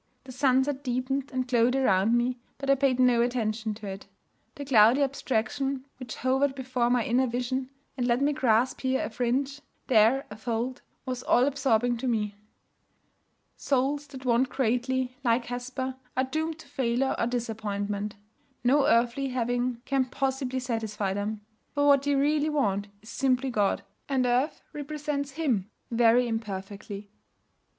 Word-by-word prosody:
The 260 - -10
sunset 265 +1 +1
deepened 255 +2 -1
and 255 -1 -2
glowed 245 0 +3
around 225 -3 +3
me, 245 +1 0 0.2
but 275 0 0
I - - +8
paid 270 -2 +2
no 250 -2 +5
attention 225 -3 -1
to 210 0 -10
it. 195 0 -7 0.5
The 285 - -6
cloudy 245 +1 +6
abstraction 270 0 -1
which 250 -4 -7
hovered 265 +2 +1
before 255 -2 0
my 245 -2 +2
inner 255 +2 +2
vision, 250 +2 -2 0.3
and 245 -2 -1
let 240 0 +2
me 285 +2 +2
grasp 250 -3 +2
here 260 0 0
a - - -6
fringe, 265 +4 -1 0.2
there 240 +3 +4
a - - -6
fold, 235 +3 -3 0.2
was 255 -1 -3
all 250 0 +4
absorbing 245 -4 +1
to 255 - -3
me. 210 -4 0 1.2
Souls 280 +2 0
that 265 -2 -10
want 250 +1 +3
greatly, 255 0 0
like 235 0 +2
Hesper, 255 +2 -4 0.2
are 260 - +3
doomed 315 +4 -2
to 315 - -14
failure 255 +1 0
or 230 - +1
disappointment. 210 -3 -3 0.5
No 270 +3 +4
earthly 240 +4 +2
having 245 -1 -1
can 270 -1 +1
possibly 265 0 -2
satisfy 220 -5 -2
them. 205 +1 -3 0.3
For 285 0 +2
what 280 -1 +6
they 285 0 +1
really 295 +2 +2
want 205 -9 0 0.2
is 220 - -12
simply 260 0 +1
God, 205 -4 +1 0.3
and 265 -2 +2
earth 250 +5 +1
represents 290 -1 -3
Him 250 - 0 0.2
very 240 +1 +4
imperfectly. 205 -2 -5
250 Hz, 155 wpm, -27 LUFS, 230-270 Hz, 1.2 s, I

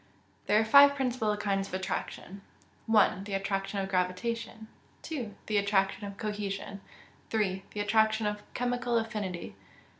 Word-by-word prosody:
_ - - -32
There 210 - +5
are 220 - +2
five 280 +5 +8
principal 245 -6 0
kinds 195 -1 -1
of - - -5
attraction: 190 0 -4 0.5
1. 210 -3 +3
The 200 -1 -3
attraction 195 0 -2
of 190 - -3
gravitation. 220 +5 -2 0.4
2. 250 -10 -5
The 215 - 0
attraction 200 0 +1
of 200 0 -9
cohesion. 205 -2 -4 0.5
3. 195 -3 -1
The 210 - -4
attraction 220 +1 +2
of 210 0 -2
chemical 245 -1 0
affinity. 210 -6 -3
4. - - -18
210 Hz, 150 wpm, -30 LUFS, 195-225 Hz, 0.5 s, five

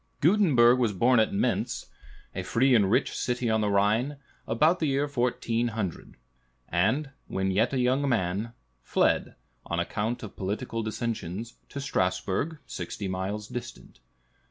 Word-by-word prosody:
Gutenberg 140 - +5
was 115 -4 +2
born 120 +5 +4
at 110 - +3
Mentz, 100 - -1 0.5
a - - -3
free 130 +3 +2
and 105 -5 +4
rich 110 - +2
city 125 -2 -1
on 110 0 +2
the 105 - +1
Rhine, 110 +8 +2 0.3
about 155 +10 +3
the 155 - +1
year 140 +1 +1
1400, 115 - -2 0.5
and, 115 - +1 0.2
when 95 0 -1
yet 110 +5 +2
a 135 - -1
young 130 +3 +2
man, 105 0 -1 0.3
fled, - - +1 0.3
on 85 - -2
account 105 +7 -2
of 105 - -8
political 110 +4 -3
dissensions, 110 -1 -4 0.2
to 140 - -6
Strasbourg, 100 - -1
sixty 100 -2 -5
miles 95 +3 -3
distant. 120 - -8
115 Hz, 140 wpm, -27 LUFS, 100-130 Hz, 0.5 s, Gutenberg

